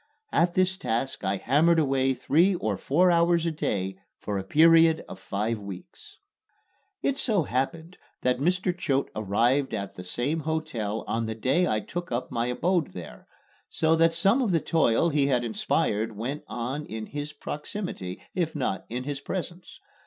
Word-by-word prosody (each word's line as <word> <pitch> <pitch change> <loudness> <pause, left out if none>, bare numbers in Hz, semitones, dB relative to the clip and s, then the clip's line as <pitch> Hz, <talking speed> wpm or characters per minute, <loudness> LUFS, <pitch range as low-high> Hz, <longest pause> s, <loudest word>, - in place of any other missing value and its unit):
At 170 +1 +2
this 185 0 +2
task 125 - -2
I 95 +1 0
hammered 155 - +3
away 135 -3 +2
three 170 +9 +3
or 110 - -1
four 175 - +3
hours 170 0 +3
a 165 - +1
day 95 -11 -2 0.2
for 100 -2 -3
a - - -4
period 160 +7 +5
of - - -9
five 110 +2 -2
weeks. 100 - -10 0.9
It 275 0 0
so 210 -8 +2
happened 160 +7 -3 0.3
that 125 0 +2
Mr. 180 +4 +1
Choate 140 -6 -1
arrived 115 +6 +1
at 100 -1 -4
the 90 - -9
same 125 - -1
hotel 150 -9 -2
on 115 0 -1
the 110 - -3
day 135 +11 +2
I 110 - 0
took 175 +4 -6
up 120 +1 -2
my 120 -1 0
abode 165 - 0
there, 90 -2 -10 0.4
so 160 0 +2
that 165 0 +3
some 195 +10 +3
of 240 - +1
the 170 -3 +3
toil 160 -2 +2
he 145 -3 +2
had 125 -3 +2
inspired 110 -1 -1
went 130 +7 -4
on 125 +5 -3
in 110 0 -5
his 145 +3 -5
proximity, 150 - -6
if 170 -4 -1
not 110 -9 -2
in 125 +2 -3
his 140 0 -4
presence. 175 +3 -6
140 Hz, 170 wpm, -27 LUFS, 115-170 Hz, 0.9 s, period